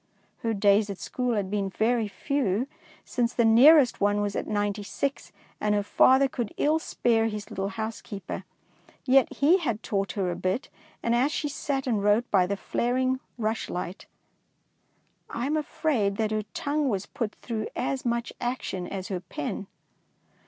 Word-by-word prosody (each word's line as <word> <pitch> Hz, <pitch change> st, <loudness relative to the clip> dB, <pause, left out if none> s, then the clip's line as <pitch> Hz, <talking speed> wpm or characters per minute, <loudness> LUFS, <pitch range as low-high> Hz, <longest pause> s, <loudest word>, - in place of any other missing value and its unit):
Her 225 Hz, -1 st, -1 dB
days 205 Hz, +1 st, +4 dB
at 200 Hz, -, -4 dB
school 250 Hz, +2 st, -2 dB
had 200 Hz, -2 st, -2 dB
been 200 Hz, -2 st, 0 dB
very 225 Hz, +3 st, +1 dB
few, 250 Hz, -1 st, -1 dB, 0.4 s
since 240 Hz, -1 st, 0 dB
the 235 Hz, -, +3 dB
nearest 255 Hz, +4 st, +7 dB
one 205 Hz, +1 st, +3 dB
was 205 Hz, -1 st, -1 dB
at -, -, -2 dB
Ninety 205 Hz, 0 st, -1 dB
six, 275 Hz, +7 st, -3 dB, 0.3 s
and 210 Hz, 0 st, +1 dB
her 205 Hz, -, +1 dB
father 265 Hz, +6 st, +5 dB
could 240 Hz, -5 st, -4 dB
ill 310 Hz, +2 st, +2 dB
spare 225 Hz, -7 st, +1 dB
his 210 Hz, -2 st, -5 dB
little 195 Hz, +1 st, -2 dB
housekeeper. 220 Hz, -2 st, -5 dB, 0.6 s
Yet 270 Hz, 0 st, +4 dB
he 325 Hz, +7 st, +4 dB
had 235 Hz, -, -2 dB
taught 195 Hz, -1 st, -1 dB
her 190 Hz, -3 st, -1 dB
a -, -, -3 dB
bit, 185 Hz, +8 st, -2 dB, 0.3 s
and 235 Hz, -, +2 dB
as 255 Hz, +5 st, +3 dB
she 310 Hz, -, -1 dB
sat 275 Hz, -1 st, -2 dB
and 220 Hz, -6 st, 0 dB
wrote 210 Hz, +4 st, +2 dB
by 185 Hz, -3 st, +4 dB
the 200 Hz, +1 st, -2 dB
flaring 255 Hz, +5 st, 0 dB, 0.2 s
rush 220 Hz, -1 st, -2 dB
light, 180 Hz, +1 st, -5 dB, 1.2 s
I 235 Hz, -, -3 dB
am 295 Hz, +3 st, 0 dB
afraid 285 Hz, -9 st, 0 dB
that 220 Hz, -1 st, 0 dB
her 215 Hz, -1 st, -1 dB
tongue 290 Hz, 0 st, 0 dB
was 200 Hz, -3 st, -1 dB
put 230 Hz, -6 st, -4 dB
through 220 Hz, -3 st, -4 dB
as 260 Hz, +1 st, -2 dB
much 235 Hz, -1 st, -1 dB
action 235 Hz, -7 st, -3 dB
as 190 Hz, -2 st, -5 dB
her 185 Hz, -2 st, -2 dB
pen. 180 Hz, +2 st, -5 dB
225 Hz, 170 wpm, -27 LUFS, 205-255 Hz, 1.2 s, nearest